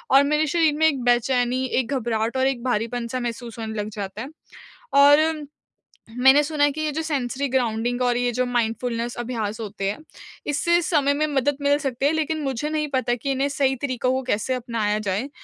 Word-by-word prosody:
और 275 Hz, -, +8 dB
मेरे 300 Hz, +2 st, +2 dB
शरीर 320 Hz, -1 st, +2 dB
में 315 Hz, -, +3 dB
एक 280 Hz, -5 st, 0 dB
बेचैनी, 245 Hz, +1 st, +2 dB
एक 260 Hz, 0 st, -1 dB
घबराहट 230 Hz, 0 st, -1 dB
और 260 Hz, 0 st, +3 dB
एक 260 Hz, -3 st, -2 dB
भारीपन-सा 240 Hz, +1 st, -1 dB
महसूस 235 Hz, -1 st, -5 dB
होने 220 Hz, -1 st, -4 dB
लग 210 Hz, -, -5 dB
जाता 200 Hz, +1 st, -5 dB
है। 265 Hz, -, -6 dB, 0.6 s
और 295 Hz, +2 st, +5 dB, 0.7 s
मैंने 265 Hz, +3 st, +6 dB
सुना 295 Hz, -1 st, 0 dB
है 290 Hz, -, +4 dB
कि 310 Hz, +2 st, -5 dB
ये 305 Hz, -1 st, -1 dB
जो 315 Hz, -, -2 dB
सेंसरी 280 Hz, -2 st, -2 dB
ग्राउंडिंग 245 Hz, -1 st, 0 dB
और 245 Hz, -1 st, +2 dB
ये 245 Hz, 0 st, +1 dB
जो 250 Hz, +2 st, 0 dB
माइंडफुलनेस 235 Hz, 0 st, -1 dB
अभ्यास 230 Hz, -3 st, -3 dB
होते 200 Hz, -2 st, -3 dB
है, 205 Hz, -, -3 dB, 0.5 s
इससे 340 Hz, +4 st, +2 dB
समय 290 Hz, -5 st, +2 dB
में 305 Hz, +2 st, +1 dB
मदद 285 Hz, -1 st, 0 dB
मिल 285 Hz, 0 st, +3 dB
सकती 270 Hz, -2 st, -2 dB
है, 290 Hz, -, +4 dB
लेकिन 315 Hz, 0 st, -1 dB
मुझे 270 Hz, +1 st, -2 dB
नहीं 305 Hz, -1 st, -1 dB
पता 250 Hz, -2 st, +1 dB
कि 275 Hz, +3 st, -3 dB
इन्हें 270 Hz, +1 st, 0 dB
सही 275 Hz, -2 st, +1 dB
तरीकों 255 Hz, -2 st, 0 dB
को 260 Hz, 0 st, 0 dB
कैसे 220 Hz, +4 st, 0 dB
अपनाया 230 Hz, -4 st, -1 dB
जाए, 210 Hz, +6 st, -2 dB
255 Hz, 200 wpm, -23 LUFS, 235-285 Hz, 0.7 s, और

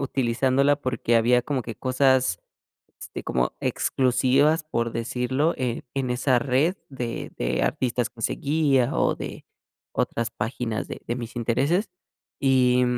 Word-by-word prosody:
utilizándola 135 Hz, +2 st, +2 dB
porque 130 Hz, -4 st, 0 dB
había 120 Hz, +2 st, +4 dB
como 135 Hz, -2 st, -2 dB
que 115 Hz, -1 st, -6 dB
cosas, 130 Hz, -6 st, +2 dB, 0.6 s
este, -, -, -7 dB
como 60 Hz, 0 st, 0 dB
exclusivas, 135 Hz, +5 st, +2 dB
por 115 Hz, -7 st, -2 dB
decirlo, 125 Hz, +7 st, 0 dB
eh, 125 Hz, -2 st, -2 dB
en 135 Hz, -2 st, -1 dB
esa 125 Hz, +1 st, +2 dB
red 140 Hz, +8 st, +1 dB
de 125 Hz, -4 st, -5 dB
de 60 Hz, +1 st, 0 dB
artistas 125 Hz, -3 st, 0 dB
que 115 Hz, -, -14 dB
seguía 140 Hz, -2 st, +1 dB
o -, -, +2 dB
de -, -, -7 dB, 0.5 s
otras 115 Hz, 0 st, -1 dB
páginas 115 Hz, 0 st, -3 dB
de -, -, -7 dB
de 120 Hz, -, -1 dB
mis 120 Hz, -1 st, -7 dB
intereses, 140 Hz, -, +1 dB, 0.5 s
y 125 Hz, -2 st, +4 dB
125 Hz, 135 wpm, -25 LUFS, 120-135 Hz, 0.6 s, había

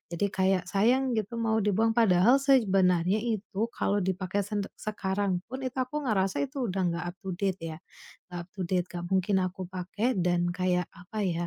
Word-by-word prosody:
Jadi, 170 Hz, +4 st, +1 dB
kayak 190 Hz, -1 st, +2 dB
sayang 245 Hz, +7 st, +2 dB
gitu 215 Hz, +3 st, -3 dB
mau 220 Hz, -1 st, +2 dB
dibuang 215 Hz, +3 st, +2 dB
padahal 225 Hz, +3 st, +5 dB
sej 270 Hz, -4 st, +4 dB
benarnya 185 Hz, +1 st, +3 dB
itu 220 Hz, -1 st, -2 dB
kalau 205 Hz, -, +1 dB
dipakai 190 Hz, +1 st, -1 dB
sende 205 Hz, -1 st, -2 dB
sekarang 200 Hz, -2 st, -1 dB
pun, 260 Hz, +2 st, -6 dB
itu 255 Hz, -, -6 dB
aku 275 Hz, +4 st, -1 dB
ngerasa 195 Hz, -4 st, +1 dB
itu 270 Hz, -2 st, -3 dB
udah 190 Hz, +1 st, -1 dB
enggak 170 Hz, 0 st, -2 dB
up-to-date 190 Hz, -1 st, -3 dB, 0.2 s
ya, -, -, -14 dB, 0.5 s
enggak 175 Hz, -, -5 dB
up-to-date, 180 Hz, -1 st, -1 dB
enggak 175 Hz, -1 st, -5 dB
mungkin 190 Hz, +1 st, +2 dB
aku 185 Hz, +1 st, -4 dB
pakai 185 Hz, +5 st, -2 dB
dan 175 Hz, 0 st, +2 dB
kayak, 180 Hz, -1 st, 0 dB
apa 180 Hz, +5 st, -9 dB
ya, 170 Hz, -1 st, -1 dB
195 Hz, 175 wpm, -28 LUFS, 180-220 Hz, 0.5 s, padahal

